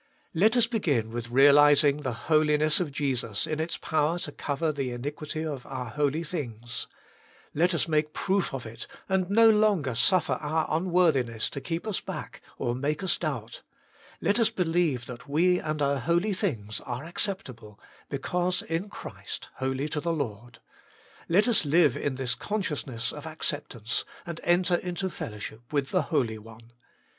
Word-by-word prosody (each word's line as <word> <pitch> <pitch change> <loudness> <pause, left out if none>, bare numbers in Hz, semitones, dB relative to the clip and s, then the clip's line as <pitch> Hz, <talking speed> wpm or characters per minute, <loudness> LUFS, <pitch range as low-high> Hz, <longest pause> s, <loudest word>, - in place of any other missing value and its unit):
Let 215 +8 +4
us 240 - +6
begin 150 - 0
with 120 0 -5
realizing 145 +2 +6
the 130 -6 -5
Holiness 155 -1 +4
of 170 -5 -2
Jesus 125 -7 -1
in 155 0 -3
its 160 +1 -2
power 155 +1 0
to 155 - -5
cover 150 +3 -1
the 140 -3 -3
iniquity 150 +5 -4
of 140 -5 -4
our 125 -3 -5
holy 150 +2 0
things; 120 -8 -4 0.7
let 175 +3 +2
us 170 - +1
make 155 -1 +1
proof 195 +3 0
of 135 -3 -5
it, 115 +2 -7 0.2
and 190 -1 +1
no 225 +3 +6
longer 205 - +2
suffer 170 - +3
our 155 +1 0
unworthiness 160 - +2
to 140 - -5
keep 165 +4 -3
us 215 -4 -1
back - - -7 0.2
or 120 - -1
make 145 +7 -2
us 185 - +3
doubt; 125 -9 -4 0.6
let 205 +4 +2
us 225 -2 +4
believe 165 - 0
that 125 +3 -10
we 180 +5 +3
and 155 -1 -2
our 140 0 +1
holy 170 - +1
things 115 - -2
are 125 +2 -5
acceptable, 135 - -3 0.3
because 180 +6 -1
in 175 +1 -3
Christ - - -8
holy 130 +2 -1
to 150 - -2
the 170 - -1
Lord; 120 -5 -5 0.7
let 200 +7 +4
us 235 -6 +3
live 150 -2 +4
in 140 -2 -2
this 130 -2 0
consciousness 145 - -2
of 150 +1 -8
acceptance, 145 -7 -1 0.2
and 170 -1 -6
enter 175 0 +3
into 185 +1 -3
fellowship 110 +1 -7
with 140 -2 0
the 185 - +3
Holy 115 -9 0
One. 115 +2 -15
150 Hz, 165 wpm, -27 LUFS, 125-175 Hz, 0.7 s, us